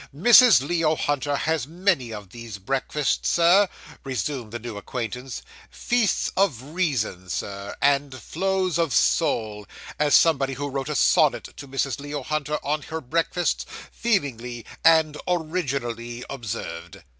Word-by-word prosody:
'Mrs. 225 - +7
Leo 165 -2 +1
Hunter 145 -1 -1
has 155 -1 -1
many 170 - 0
of 105 -3 -8
these 115 -2 -8
breakfasts, 135 +6 -1
Sir,' 180 +4 +5 0.3
resumed 130 -2 -3
the 120 - -4
new 120 -1 -7
acquaintance 125 +4 -5 0.3
'"feasts 240 -4 0
of 190 - +2
reason," 120 - -1
sir, 100 +1 -5
"and 140 0 +3
flows 190 -1 -1
of 160 -9 +1
soul," 105 -2 +1 0.3
as 150 -1 +4
somebody 140 -5 +4
who 145 +2 -4
wrote 135 +1 -4
a 150 - -2
sonnet - - +3
to 140 - -10
Mrs. 135 -2 -2
Leo 145 -1 -5
Hunter 150 +1 -2
on 150 +1 0
her 160 +2 -5
breakfasts, 165 +5 -1 0.3
feelingly 125 - -2 0.2
and 160 -2 +5
originally 135 -9 -2
observed. 85 -9 -6
140 Hz, 135 wpm, -24 LUFS, 120-165 Hz, 0.3 s, Mrs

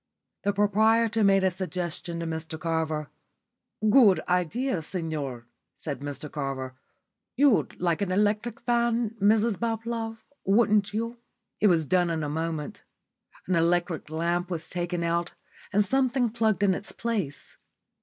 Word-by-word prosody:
The 200 - +1
proprietor 220 +2 +3
made 195 -1 +4
a 190 - +3
suggestion 175 -1 -4
to - - -3
Mr 160 -1 -4
Carver. 160 -2 -2 0.8
"Good 215 -4 +6
idea, 180 - 0
signor," 150 -8 -4 0.3
said 145 -5 -5
Mr 145 +1 -6
Carver. 135 -3 -4 0.6
"You'd 275 -4 +3
like 175 +2 0
an 195 -2 0
electric 210 +4 0
fan, 235 -2 +1
Mrs 215 +1 +3
Bablove, 225 0 -2 0.3
wouldn't 205 0 +3
you?" 230 +3 -3 0.4
It 210 - +4
was 165 -5 +3
done 180 +3 +2
in 160 -2 -1
a 145 - -2
moment. 160 0 -3 0.6
An 185 - -1
electric 170 -1 +1
lamp 170 +3 -1
was 170 -2 -5
taken 175 -1 -2
out, 170 +1 -1 0.4
and 205 +1 +3
something 255 0 +1
plugged 220 -3 +1
in 195 -2 +4
its 195 - -6
place. 200 -12 -4
185 Hz, 135 wpm, -27 LUFS, 165-220 Hz, 0.8 s, Good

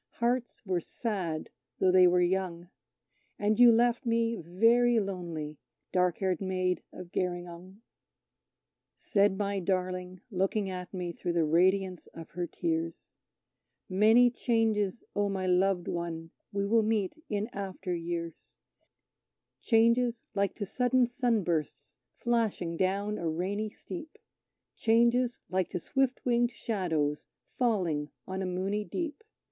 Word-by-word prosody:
Hearts 240 0 -1
were 185 -3 0
sad 180 -7 -3 0.3
though 185 - +3
they 185 0 +7
were 180 0 +4
young, 175 -1 -1 0.7
And 210 +2 +1
you 245 -1 +9
left 240 +3 +3
me 230 -1 +1
very 230 +7 +3
lonely, 170 -7 -4 0.3
dark 180 -2 +2
haired 185 -2 -1
Maid 185 -2 0
of 180 -1 -10
Gerringong. 180 +3 -4 1.1
Said 200 -1 +2
my 200 -1 -1
darling, 185 0 -2
looking 195 +1 0
at 180 -1 -6
me, 180 -2 -4
through 175 +1 -3
the 170 -2 +2
radiance 185 +3 +2
of 165 -1 -9
her 175 0 -3
tears: 165 0 -3 0.7
"Many 220 +6 +5
changes, 225 -4 0
O 205 0 +1
my 190 -1 -2
loved 180 0 +2
One, 165 -1 -4 0.2
we 200 0 -1
will 225 +3 +4
meet 215 -3 0 0.2
in 210 0 -1
after 190 -2 -4
years; 170 -1 -5 1.0
Changes 235 +1 +3
like 200 -1 0
to 205 - -3
sudden 250 +4 +2
sunbursts 225 - -1 0.2
flashing 225 -8 0
down 200 +4 0
a 170 - -1
rainy 195 +6 -2
steep 320 - -9 0.6
Changes 235 +2 +3
like 185 -1 0
to 180 - -3
swift 265 - 0
winged 240 -1 +3
shadows 170 -11 -2 0.2
falling 180 -12 0 0.2
on 190 0 -3
a 190 - -2
moony 190 +3 -1
deep! 330 - -4
190 Hz, 130 wpm, -30 LUFS, 175-225 Hz, 1.1 s, you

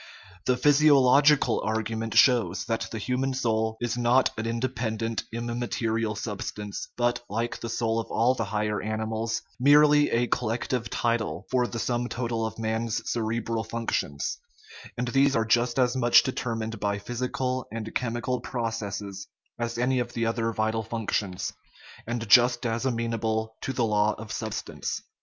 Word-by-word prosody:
The 125 - +2
physiological 145 0 +5
argument 110 +1 -2
shows 100 -7 +4
that 115 +2 -2
the 115 - -4
human 130 +4 -1
soul 110 -3 0
is 120 0 -2
not 120 +2 +3
an 115 0 -3
independent, 115 -1 -2
immaterial 115 -1 -2
substance, 105 -1 -5
but, 120 0 +1
like 115 +3 -2
the 115 - -5
soul 115 -1 0
of 115 - -4
all 120 +3 +3
the 115 -3 -2
higher 105 0 -1
animals, 110 +1 -2 0.2
merely 145 +2 +6
a 120 +1 +2
collective 120 0 -1
title 115 -1 -1
for 125 -2 +2
the 120 - -6
sum 120 +1 -1
total 115 -2 -2
of - - -8
man's 115 0 -2
cere 115 0 -1
bral 115 -1 -2
functions; 110 -10 -2 0.6
and 125 - -1
these 135 +2 +3
are 115 - +2
just 120 +2 +2
as 125 -1 +3
much 120 -1 +6
determined 115 -4 -3
by 100 0 0
physical 125 +3 -3
and 110 0 -5
chemical 120 +1 -1
processes 105 -5 -4 0.3
as 120 0 -2
any 125 +1 +1
of 120 -1 -3
the 115 -1 -1
other 115 0 0
vital 110 0 0
functions, 105 -4 -2 0.5
and 120 -1 -3
just 120 +3 +5
as 115 +3 0
amenable 110 -2 -1
to - - -2
the 125 -3 0
law 105 -1 +2
of 110 -1 -8
sub - - -3
stance. - - -4
115 Hz, 155 wpm, -27 LUFS, 110-125 Hz, 0.6 s, merely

